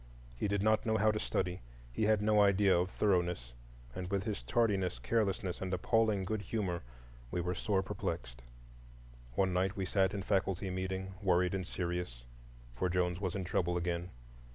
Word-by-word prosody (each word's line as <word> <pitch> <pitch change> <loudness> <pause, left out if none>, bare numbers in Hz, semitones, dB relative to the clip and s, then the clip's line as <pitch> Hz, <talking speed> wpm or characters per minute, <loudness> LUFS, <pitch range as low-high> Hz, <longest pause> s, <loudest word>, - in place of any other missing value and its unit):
He - - -1
did 100 0 0
not 110 0 +3
know 110 -1 +1
how 110 +1 +4
to 105 - -2
study; 90 -3 -1 0.3
he 110 - +1
had 105 -1 +3
no 105 0 +5
idea 100 -1 +5
of 90 +2 +1
thoroughness; 90 - 0 0.4
and 90 +5 -5
with 100 -1 0
his 105 - -3
tardiness, 95 - +1
carelessness, 95 - 0
and 95 -1 -2
appalling 105 +1 +2
good 110 +2 -2
humor, 95 -5 -2 0.5
we 90 - -2
were 90 +1 -1
sore 95 +2 0
perplexed. - - -4 0.9
One 95 -2 +2
night 95 +2 +1
we 95 - -1
sat 95 +1 +2
in 100 - -3
faculty 95 -1 0
meeting, 95 +1 -3
worried 90 -2 +3
and 95 -2 -2
serious; 85 -11 -3 0.5
for 75 +10 -1
Jones 90 0 0
was 95 -2 -1
in 95 - -2
trouble 90 0 0
again. 85 0 -2
95 Hz, 175 wpm, -34 LUFS, 90-100 Hz, 0.9 s, no